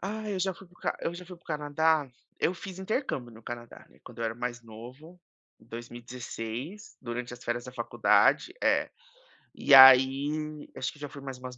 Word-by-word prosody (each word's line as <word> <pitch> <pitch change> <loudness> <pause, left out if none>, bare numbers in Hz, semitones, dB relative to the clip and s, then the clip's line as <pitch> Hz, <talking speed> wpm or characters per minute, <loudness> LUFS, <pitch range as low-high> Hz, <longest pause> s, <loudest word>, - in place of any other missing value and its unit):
Ah, 215 +2 -4
eu 195 - -2
já 190 +1 0
fui 190 - -15
para 175 - -24
o - - -25
ca - - -1
eu 170 - -3
já 180 +1 -9
fui 180 0 -10
para 170 - -27
o - - -28
Canadá. 150 -1 +1 0.3
Eu 175 - +1
fiz 185 0 -9
intercâmbio 185 - -3
no 110 0 -15
Canadá, 120 0 -9
né, - - -23
quando 120 - -13
eu 115 - -2
era 110 - -2
mais 120 +1 -4
novo, 125 +10 -12 0.4
em - - -20
2016, 120 - -7
durante 125 0 -5
as 125 +1 -10
férias 120 0 -2
da 125 - -9
faculdade 120 -2 +2
é. - - +2 0.6
E - - +1
aí, 140 +4 +6
acho - - -3
que 150 - -18
já 145 - -6
fui 140 +1 -10
mais 135 -1 -7
umas 125 0 -9
135 Hz, 205 wpm, -28 LUFS, 120-170 Hz, 0.6 s, aí